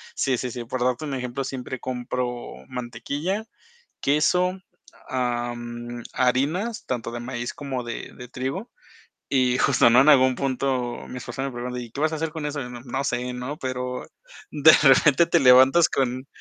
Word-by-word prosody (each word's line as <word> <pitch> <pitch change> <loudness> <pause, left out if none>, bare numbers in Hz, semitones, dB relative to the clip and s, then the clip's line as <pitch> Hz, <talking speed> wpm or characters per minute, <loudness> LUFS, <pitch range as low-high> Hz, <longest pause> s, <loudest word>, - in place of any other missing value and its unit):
sí, 130 -2 +1
sí, 125 - -3
sí, 120 +1 -5
por 125 +2 -4
darte 125 +3 0
un 145 - -4
ejemplo, 125 +1 -3
siempre 130 -1 -5
compro 125 -1 -4
mantequilla, 135 - -4 0.6
queso, 180 +6 +2 0.5
am, 120 -1 -3
harinas, 150 - 0
tanto 120 -2 -3
de 120 - -5
maíz 120 0 -5
como 140 -5 -4
de 120 -1 -6
de 125 - -10
trigo, 135 - -4 0.6
y 130 -2 +2
justo, 130 -4 +4
¿no? 120 +2 +7
En 140 - +4
algún 130 -3 +6
punto, 130 -2 -2
mi 125 - -6
esposa 125 +2 -6
me 135 - -3
pregunta: 125 +1 -5
"¿Y 120 -2 -8
qué 140 - -7
vas 155 +1 +1
a - - -1
hacer 160 +1 -2
con 155 -2 -4
eso?" 145 0 -3
Y 125 - -7
no, 120 -1 -8
no 135 +2 -3
sé, 125 -1 -2
¿no? 125 +5 -5
Pero, 125 -1 -4 0.4
de 155 +1 +7
repente 150 +3 +6
te 170 - +3
levantas 130 +6 +7
con 130 0 -1
130 Hz, 175 wpm, -24 LUFS, 125-140 Hz, 0.6 s, no